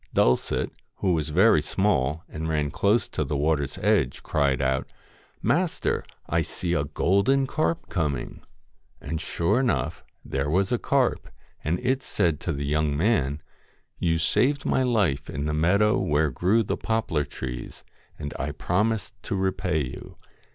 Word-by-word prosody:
Dulcet, 60 - +2 0.2
who 95 -2 +1
was 80 -2 -1
very 90 +1 +5
small, 75 -3 0
and 80 +1 -5
ran 75 -2 0
close 105 +4 +2
to - - -1
the 75 - -2
water's 75 -1 0
edge, - - +1
cried 70 -4 +1
out, 65 0 0 0.3
* - - -32
Master, - - +1 0.2
I 85 +1 +1
see 85 +2 -3
a 70 -4 +1
golden 100 - +2
carp 155 +4 -1
coming.' 75 -9 -2 0.6
And 80 0 -4
sure 90 +9 +1
enough 80 - 0 0.2
there 70 +1 -2
was 95 +4 +1
a 120 - +1
carp, 135 -3 +1 0.3
and 80 +3 0
it 130 +2 +1
said 85 - 0
to 85 - -2
the 70 -1 -3
young 75 0 +1
man: 80 - +1 0.6
'You 80 -1 +2
saved 135 - +2
my - - +2
life 100 - +1
in 70 0 -3
the 75 - -1
meadow 100 +9 +3
where 75 - +1
grew 95 - +2
the - - -2
poplar 110 -10 0
trees, 60 -3 -7 0.3
and 75 - -5
I - - -2
promised 105 +3 0
to 100 - -3
repay 95 -4 0
you. 60 - -9
80 Hz, 160 wpm, -26 LUFS, 75-105 Hz, 0.6 s, very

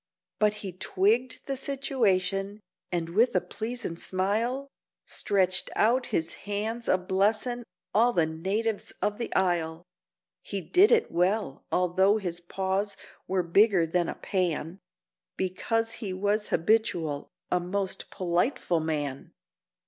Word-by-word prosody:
But 210 -1 +4
he 190 - -3
twigged 215 +7 0
the 275 - -2
situation, 205 -8 0 0.3
and 170 -2 -1
with 220 +8 +3
a - - +6
pleasin' 225 -6 -5
smile 220 +10 -1 0.4
Stretched 185 -2 0
out 245 +4 +3
his 165 -8 -1 0.2
hands, 220 +3 -2
a - - +4
blessin' 210 +6 0 0.3
all 235 +4 +5
the 170 -8 +3
natives 195 +7 -2
of 210 +1 0
the 235 - -3
isle; 170 -2 +1 0.6
He 200 - -4
did 360 - +4
it 465 -1 +3
well, 180 -4 0
although 190 +3 +3
his 175 -5 -3
paws 190 +3 -2 0.3
were 185 -1 +1
bigger 190 +1 +4
than 170 +1 0
a - - -4
pan, 180 -2 -2 0.6
Because 225 +5 0
he 210 -5 -4
was 205 +3 0
habitual 165 -6 +1 0.2
a 180 - +3
most 190 +2 -3
politeful 175 - 0
man. 145 -4 -3
195 Hz, 125 wpm, -28 LUFS, 175-225 Hz, 0.6 s, a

